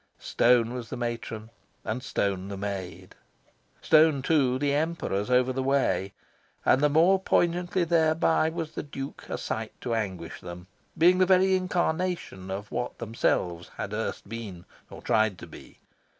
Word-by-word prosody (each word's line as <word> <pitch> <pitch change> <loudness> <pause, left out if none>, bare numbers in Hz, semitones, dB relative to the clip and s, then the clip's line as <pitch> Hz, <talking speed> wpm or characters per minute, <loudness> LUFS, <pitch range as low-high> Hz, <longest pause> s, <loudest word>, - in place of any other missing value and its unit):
Stone 120 -1 +2
was 120 -3 -6
the 130 - -5
matron, 115 -2 -5 0.3
and 115 +3 -2
stone 100 -6 -2
the 100 0 -6
maid. 95 -2 -6 0.7
Stone, 155 -3 +5
too, 135 -5 +2
the 140 +1 0
Emperors 145 -10 -1
over 125 +1 +3
the 130 - -2
way; 130 -8 +1 0.5
and 130 - +4
the 150 - +4
more 170 +6 +4
poignantly 175 0 +1
thereby 160 -1 +2
was 160 -1 -5
the - - -4
Duke 140 -1 -8
a - - -2
sight - - -5
to 120 - -2
anguish 95 -7 -4
them, 90 0 -9 0.3
being 180 +3 +5
the 185 - +4
very 190 0 +4
incarnation 180 - -2
of 100 +2 -5
what 125 - -3
themselves 90 -6 -1
had 100 +1 -4
erst 110 -1 -4
been, 105 -6 -7 0.2
or - - -11
tried 110 -3 +2
to - - -9
be. - - -14
125 Hz, 155 wpm, -27 LUFS, 105-160 Hz, 0.7 s, Stone